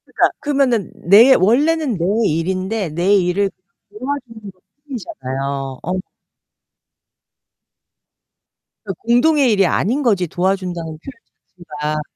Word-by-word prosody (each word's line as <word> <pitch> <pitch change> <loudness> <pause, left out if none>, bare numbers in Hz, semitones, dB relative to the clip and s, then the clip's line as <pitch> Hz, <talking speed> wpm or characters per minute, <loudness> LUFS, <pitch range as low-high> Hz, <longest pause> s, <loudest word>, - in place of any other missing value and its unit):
그러니까 - - +1
그러면은 270 - 0
내 220 +9 +6
원래는 275 - +2
내 170 - -1 0.2
일인데 185 +5 -2
내 175 +6 +2
일을 195 +1 +1 0.4
도와주는 230 -2 -6
것 185 0 -36 0.3
뿐이잖아요. 135 - -5
어. 185 +2 -2 2.8
그 195 - -4
공동의 250 +3 +3
일이 200 -2 +3
아닌 240 +11 0
거지. 200 -8 +1
도와준다는 175 -2 -2
표현 225 - -10 0.7
자체가. 150 +1 -1
195 Hz, 245 characters per minute, -18 LUFS, 175-240 Hz, 2.8 s, 내